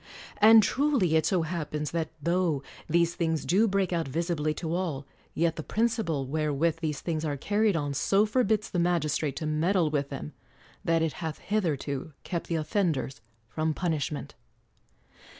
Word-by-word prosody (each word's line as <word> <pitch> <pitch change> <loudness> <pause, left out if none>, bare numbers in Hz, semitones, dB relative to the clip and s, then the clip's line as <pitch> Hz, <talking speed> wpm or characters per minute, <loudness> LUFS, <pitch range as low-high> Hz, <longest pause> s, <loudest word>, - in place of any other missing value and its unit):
And 220 +1 +8
truly 260 - +2
it 160 -1 +3
so 180 -2 +2
happens 150 -3 -3
that 165 -2 -1
tho 170 -4 +1 0.3
these 170 +1 +3
things 160 -2 -1
do 205 +7 +3
break 195 -2 0
out 165 -3 0
visi 170 +6 -1
bly 155 -1 0
to 160 +1 -4
all, 165 -7 -2 0.3
yet 165 0 +1
the - - -2
principle 215 - 0
wherewith 155 +3 0
these 155 -4 -3
things 160 -2 -2
are 145 -3 -2
carried 205 +5 +1
on 145 -3 -1
so 195 +9 +3
forbids 220 -1 +1
the 180 - 0
magistrate 155 -4 +1
to 155 - -4
med 155 +5 +1
dle 170 -6 +2
with 145 -2 -1
them 75 - -6 0.5
that 165 -1 +2
it 160 - 0
hath 160 -2 -3
hitherto 155 -8 -2
kept 170 -3 -4
the 170 - -1
of 155 -2 -2
fenders 155 - -1 0.3
from 155 +5 -1
punishment. 155 -4 -2
165 Hz, 170 wpm, -28 LUFS, 150-185 Hz, 0.5 s, And